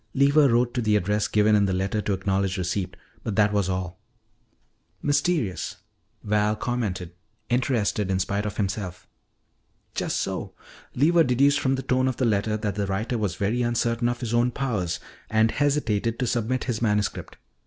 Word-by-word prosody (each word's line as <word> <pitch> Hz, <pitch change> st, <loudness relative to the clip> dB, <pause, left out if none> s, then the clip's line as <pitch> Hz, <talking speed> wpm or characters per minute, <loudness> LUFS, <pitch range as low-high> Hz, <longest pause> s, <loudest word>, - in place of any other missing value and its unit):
Lever 140 Hz, +1 st, +5 dB
wrote 120 Hz, +1 st, +2 dB
to 125 Hz, -, -1 dB
the 110 Hz, -2 st, +2 dB
address 105 Hz, +1 st, +1 dB
given 105 Hz, 0 st, +3 dB
in 100 Hz, -1 st, +4 dB
the 95 Hz, -, 0 dB
letter 95 Hz, +3 st, -1 dB
to 105 Hz, -, -1 dB
acknowledge 95 Hz, 0 st, 0 dB
receipt, 90 Hz, 0 st, -2 dB, 0.3 s
but 110 Hz, -, -3 dB
that 105 Hz, 0 st, +3 dB
was 100 Hz, -2 st, +1 dB
all." 90 Hz, -1 st, -3 dB, 1.0 s
"Mysterious," 145 Hz, -, 0 dB, 0.5 s
Val 105 Hz, 0 st, +1 dB
commented, 105 Hz, -7 st, -3 dB, 0.4 s
interested 120 Hz, -5 st, +1 dB
in 95 Hz, -, +1 dB
spite 100 Hz, +3 st, -1 dB
of 105 Hz, -, -6 dB
himself. 95 Hz, -3 st, -3 dB, 0.9 s
"Just -, -, -1 dB
so. -, -, -3 dB, 0.4 s
Lever 165 Hz, +5 st, +4 dB
deduced 140 Hz, +2 st, +3 dB
from 135 Hz, -1 st, +1 dB
the 135 Hz, -, -4 dB
tone 130 Hz, 0 st, +1 dB
of 130 Hz, -, -1 dB
the 130 Hz, -, +1 dB
letter 110 Hz, -1 st, +1 dB
that 105 Hz, -2 st, -2 dB
the 100 Hz, 0 st, -2 dB
writer 110 Hz, +5 st, -1 dB
was 100 Hz, -5 st, -1 dB
very 105 Hz, +6 st, 0 dB
uncertain 120 Hz, 0 st, +1 dB
of 120 Hz, +1 st, -3 dB
his 120 Hz, -2 st, -3 dB
own 120 Hz, +1 st, +3 dB
powers 105 Hz, -10 st, -2 dB, 0.3 s
and 110 Hz, +1 st, +3 dB
hesitated 120 Hz, -7 st, 0 dB
to 125 Hz, -, -1 dB
submit 120 Hz, +2 st, 0 dB
his 120 Hz, -3 st, -2 dB
manuscript. 105 Hz, -3 st, -1 dB
110 Hz, 170 wpm, -25 LUFS, 100-125 Hz, 1.0 s, Lever